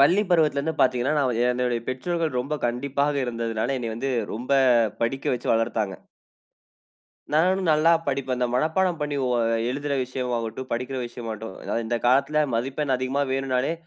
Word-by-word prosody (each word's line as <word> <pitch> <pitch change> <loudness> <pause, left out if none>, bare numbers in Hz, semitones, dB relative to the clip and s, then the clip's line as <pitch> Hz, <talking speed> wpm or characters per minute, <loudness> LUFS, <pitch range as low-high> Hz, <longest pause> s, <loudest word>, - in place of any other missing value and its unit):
பள்ளி 175 +9 +5
பருவத்துல 155 -4 +3
இருந்து 160 +2 -2
பார்த்தீங்கன்னா! 130 +2 +2
"நான் 125 -5 +1
என்னோடய 120 -2 -1
பெற்றோர்கள் 160 +2 -1
ரொம்ப 140 +5 -3
கண்டிப்பாக 140 +4 0
இருந்ததனால 115 +1 -2
என்னய 115 -2 -4
வந்து 135 +4 -2 0.2
ரொம்ப 125 +4 -6 0.5
படிக்க 135 +4 -1
வைச்சு 120 -1 -3
வளர்த்தாங்க." 110 -3 -1 1.4
"நானும் 185 +4 +3
நல்லா 155 +2 +5 0.2
படிப்பேன்." 130 -2 -1
இந்த 125 - +1
மனப்பாடம் 160 +5 +1
பண்ணி 150 -1 -1
ஓ - - 0 0.4
எழுதுற 140 +2 -2
விஷயம் 125 0 -4
ஆகட்டும், 115 +3 -5
படிக்கிற 125 +2 -2
விஷயமாகட்டும். 115 -1 -5
இந்த 120 +1 0
காலத்தில 140 +4 +3
மதிப்பெண் 135 +3 0
அதிகமா 130 +3 0
வேணும்னாலே 135 +2 0
130 Hz, 145 wpm, -25 LUFS, 120-145 Hz, 1.4 s, பள்ளி